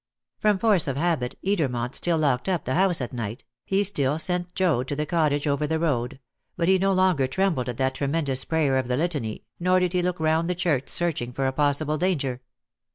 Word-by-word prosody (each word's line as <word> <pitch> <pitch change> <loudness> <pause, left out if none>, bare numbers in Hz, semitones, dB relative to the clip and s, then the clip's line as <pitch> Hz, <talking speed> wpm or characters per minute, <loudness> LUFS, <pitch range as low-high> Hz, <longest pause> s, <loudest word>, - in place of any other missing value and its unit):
From 210 -2 +3
force 200 -6 +3
of 135 -1 -2
habit 155 -6 -1
Edermont 135 -11 0
still 170 -2 0
locked 145 0 +1
up 175 -5 -1
the 130 - -1
house 180 -2 +2
at 125 - -4
night; 115 +1 -5 0.2
he 195 +1 +1
still 150 -7 +1
sent 180 +1 -2
Joad 160 -10 +1
to 145 - -2
the 150 +1 -1
cottage 150 -3 +1
over 145 +1 0
the 160 +1 0
road; 135 -5 -1 0.4
but 170 - 0
he 190 0 +4
no 195 +1 +2
longer 185 -8 +3
trembled 135 -4 0
at 120 - -5
that 130 0 +1
tremendous 140 -1 -1
prayer 150 -5 +1
of 130 - -3
the 125 0 0
Litany, 145 -9 -2 0.2
nor 185 +1 +3
did 180 -1 0
he 180 - +2
look 180 -1 -1
round 160 +2 +1
the 180 - 0
church 165 -7 0
searching 155 -8 -1
for 135 +2 -2
a 130 - 0
possible 150 +2 +1
danger. 140 -9 -1
155 Hz, 215 wpm, -25 LUFS, 130-180 Hz, 0.4 s, he